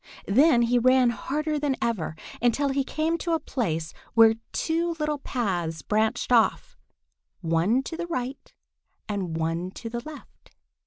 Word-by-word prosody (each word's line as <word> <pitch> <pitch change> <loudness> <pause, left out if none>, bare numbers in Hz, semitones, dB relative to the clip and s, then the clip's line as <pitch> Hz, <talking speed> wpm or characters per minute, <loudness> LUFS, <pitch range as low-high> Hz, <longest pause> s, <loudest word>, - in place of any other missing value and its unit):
Then 245 +4 +5
he 240 +1 +3
ran 255 0 +4
harder 300 +7 -2
than 285 -2 0
ever, 195 -9 -2 0.3
until 245 +4 +2
he 275 0 +1
came 320 +4 -1
to 335 - -1
a 325 - +2
place 165 - -3 0.2
where 225 -1 +7 0.2
two 335 +1 -1
little 300 -1 -1
paths 175 - -2
branched 215 +3 0
off, 230 -2 +2 0.7
one 170 +10 +2
to 325 - -6
the 340 +1 -4
right 260 -4 -4 0.6
and 190 -6 -3
one 165 +2 -1
to 225 +4 -8
the 235 - -3
left. 305 0 -13
245 Hz, 150 wpm, -26 LUFS, 200-295 Hz, 0.7 s, where